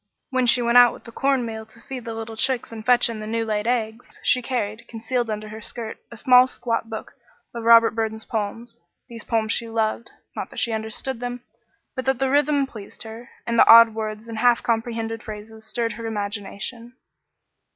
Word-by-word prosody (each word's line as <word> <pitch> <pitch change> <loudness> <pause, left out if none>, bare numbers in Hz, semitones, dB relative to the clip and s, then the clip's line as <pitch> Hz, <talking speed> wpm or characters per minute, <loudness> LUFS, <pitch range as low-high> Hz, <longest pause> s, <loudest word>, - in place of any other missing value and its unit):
When 255 -1 +1
she 245 0 +4
went 235 +1 +6
out 245 -1 +7
with - - -13
the 230 - -11
corn 270 0 +1
meal 220 -1 -5
to - - -15
feed 255 -3 -8
the 230 -1 -5
little 225 0 -6
chicks 250 +1 0
and 220 -1 -7
fetch 245 +1 +4
in 230 -2 -5
the 215 - -6
new 225 +1 -1
laid 215 0 -1
eggs, 230 -1 -2
she 250 - +3
carried, 225 -3 -3
concealed 235 +1 -2
under 215 0 -4
her 220 +1 -8
skirt, 225 0 -7
a 235 - -10
small, 250 +2 +6
squat 230 -2 -3
book 220 -1 -6 0.4
of 235 -1 -5
Robert 230 0 +7
Burns' 220 -1 -3
poems. 230 +2 -4 0.3
These 230 -2 -8
poems 220 -1 0
she 230 0 -1
loved; 225 +1 -1 0.3
not - - -4
that - - -13
she 235 - +1
understood 220 +3 -4
them, 245 0 -5 0.5
but 260 -1 -4
that 265 -1 +2
the 265 +1 0
rhythm 290 0 +3
pleased 215 -7 -10
her, 225 +2 -10 0.2
and 235 -1 0
the - - +7
odd 230 -1 +9
words 215 0 -5
and 225 -1 -5
half 240 0 +4
comprehended 225 -1 -2
phrases 220 0 -9
stirred 230 +1 -1
her 230 +1 -6
imagination. 215 +3 -4
230 Hz, 205 wpm, -23 LUFS, 220-245 Hz, 0.5 s, odd